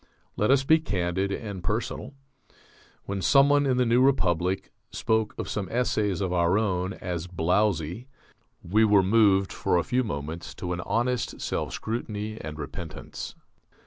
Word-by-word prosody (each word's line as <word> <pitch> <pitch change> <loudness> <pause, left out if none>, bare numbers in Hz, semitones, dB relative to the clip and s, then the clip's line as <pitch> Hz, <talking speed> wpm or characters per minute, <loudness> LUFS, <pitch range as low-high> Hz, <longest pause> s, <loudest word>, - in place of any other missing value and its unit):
Let 105 - +1
us 135 0 +4
be 160 +4 +5
candid 95 - -1
and 100 -3 -5
personal. 120 +6 -3 0.9
When 100 0 -3
someone 140 +4 +5
in 130 -2 +2
The 125 - +3
New 120 +2 +3
Republic 95 -8 +1 0.2
spoke 110 -1 0
of - - -4
some 100 -3 -3
essays 105 -5 0
of 95 -2 -1
our 85 +2 +3
own 95 -3 0
as 90 -2 -4
"blowzy" 90 - 0 0.6
we 105 +6 +3
were 105 -3 +5
moved 100 -1 +3
for - - +1
a 85 - +2
few 130 +1 +1
moments 80 - -5
to 90 -1 -4
an 90 - -4
honest 120 +5 -1
self - - -2
scrutiny 110 -1 -4
and 75 -1 -7
repentance. 75 +2 -7
100 Hz, 150 wpm, -26 LUFS, 90-115 Hz, 0.9 s, be